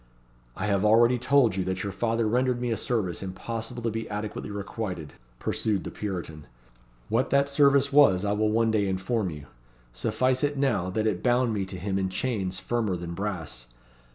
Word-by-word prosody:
"I 95 Hz, -, -3 dB
have 100 Hz, -1 st, +1 dB
already 115 Hz, +3 st, +5 dB
told 130 Hz, -5 st, +3 dB
you 95 Hz, -, 0 dB
that 95 Hz, 0 st, -2 dB
your 100 Hz, -, -3 dB
father 115 Hz, +3 st, 0 dB
rendered 125 Hz, +2 st, +1 dB
me 120 Hz, -1 st, -1 dB
a -, -, +1 dB
service 105 Hz, -8 st, -2 dB
impossible 115 Hz, +5 st, -5 dB
to 115 Hz, -, 0 dB
be 115 Hz, +1 st, -4 dB
adequately 105 Hz, 0 st, -4 dB
requited," 100 Hz, -6 st, -5 dB, 0.2 s
pursued 100 Hz, -, -1 dB
the -, -, -6 dB
Puritan. 85 Hz, -7 st, -5 dB, 0.6 s
"What 115 Hz, +4 st, +1 dB
that 140 Hz, +1 st, +3 dB
service 140 Hz, -1 st, +4 dB
was 105 Hz, -10 st, +6 dB
I 100 Hz, -, +1 dB
will 105 Hz, +1 st, +1 dB
one 115 Hz, +1 st, +2 dB
day 105 Hz, -2 st, +1 dB
inform 95 Hz, +2 st, -1 dB
you. 75 Hz, -3 st, -8 dB, 0.5 s
Suffice 125 Hz, -, 0 dB
it 145 Hz, 0 st, 0 dB
now, 125 Hz, -10 st, +1 dB
that 110 Hz, +3 st, -1 dB
it 100 Hz, -5 st, 0 dB
bound 125 Hz, -1 st, +2 dB
me 100 Hz, -3 st, -2 dB
to 95 Hz, -, -7 dB
him 95 Hz, +2 st, -2 dB
in 95 Hz, -1 st, 0 dB
chains 95 Hz, -2 st, -2 dB
firmer 110 Hz, 0 st, -1 dB
than 85 Hz, -1 st, -5 dB
brass. 85 Hz, -11 st, -5 dB
105 Hz, 185 wpm, -27 LUFS, 95-120 Hz, 0.6 s, was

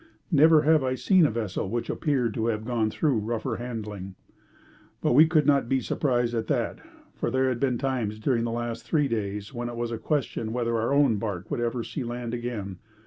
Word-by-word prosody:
Never 155 Hz, 0 st, +6 dB
have 155 Hz, -2 st, +4 dB
I 130 Hz, 0 st, 0 dB
seen 180 Hz, +3 st, +4 dB
a -, -, -1 dB
vessel 105 Hz, -4 st, -3 dB
which 120 Hz, +2 st, -2 dB
appeared 130 Hz, -8 st, 0 dB
to 110 Hz, +2 st, -1 dB
have 110 Hz, -1 st, -1 dB
gone 115 Hz, -3 st, 0 dB
through 135 Hz, 0 st, +1 dB
rougher 110 Hz, +1 st, -2 dB
handling. 105 Hz, -6 st, -6 dB, 0.8 s
But -, -, +1 dB
we 155 Hz, +5 st, +7 dB
could 155 Hz, -3 st, +3 dB
not 140 Hz, -4 st, +3 dB
be 135 Hz, -, +2 dB
surprised 120 Hz, -3 st, 0 dB
at 115 Hz, -1 st, -2 dB
that, -, -, -1 dB, 0.3 s
for -, -, -2 dB
there 130 Hz, 0 st, +2 dB
had 125 Hz, -2 st, -2 dB
been 130 Hz, -2 st, +1 dB
times 120 Hz, -5 st, -2 dB
during 115 Hz, +1 st, 0 dB
the 120 Hz, -, -1 dB
last 120 Hz, 0 st, -3 dB
three 150 Hz, -3 st, +1 dB
days 105 Hz, -1 st, -3 dB
when 120 Hz, -1 st, -4 dB
it 120 Hz, -, -6 dB
was 120 Hz, 0 st, -3 dB
a 115 Hz, -, -4 dB
question 125 Hz, -7 st, -2 dB
whether 115 Hz, -1 st, 0 dB
our 115 Hz, +2 st, 0 dB
own 140 Hz, -6 st, +4 dB
barque 100 Hz, -2 st, -4 dB
would -, -, -1 dB
ever 120 Hz, 0 st, -1 dB
see 135 Hz, -, -5 dB
land 120 Hz, 0 st, -5 dB
again. 115 Hz, -6 st, -4 dB
120 Hz, 210 wpm, -26 LUFS, 110-135 Hz, 0.8 s, we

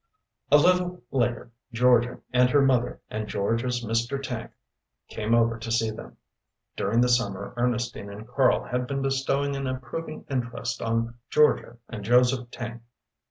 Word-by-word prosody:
A 145 Hz, -, +9 dB
little 180 Hz, 0 st, +2 dB
later 120 Hz, -2 st, -1 dB, 0.2 s
Georgia 120 Hz, 0 st, +3 dB
and 125 Hz, 0 st, +5 dB
her 145 Hz, +1 st, +4 dB
mother 125 Hz, -2 st, +1 dB
and 110 Hz, 0 st, -3 dB
Georgia's 120 Hz, +5 st, -1 dB
Mr. 115 Hz, +5 st, -1 dB
Tank 130 Hz, -4 st, -5 dB, 0.6 s
came 110 Hz, +1 st, 0 dB
over 115 Hz, -1 st, +2 dB
to 115 Hz, 0 st, -5 dB
see 115 Hz, -1 st, +1 dB
them. 110 Hz, -, -10 dB, 0.6 s
During 115 Hz, +5 st, +1 dB
the 125 Hz, -, +4 dB
summer 100 Hz, -5 st, 0 dB
Ernestine 120 Hz, -3 st, -1 dB
and 105 Hz, +2 st, -9 dB
Karl 130 Hz, +1 st, +2 dB
had 125 Hz, 0 st, -2 dB
been 135 Hz, 0 st, -2 dB
bestowing 135 Hz, +1 st, 0 dB
an 135 Hz, -1 st, -3 dB
approving 130 Hz, +5 st, -5 dB
interest 120 Hz, -3 st, -3 dB
on 115 Hz, +1 st, -1 dB
Georgia 150 Hz, -5 st, +3 dB
and 110 Hz, -3 st, -7 dB
Joseph 125 Hz, +2 st, +3 dB
Tank. 120 Hz, -1 st, -7 dB
120 Hz, 150 wpm, -26 LUFS, 115-130 Hz, 0.6 s, A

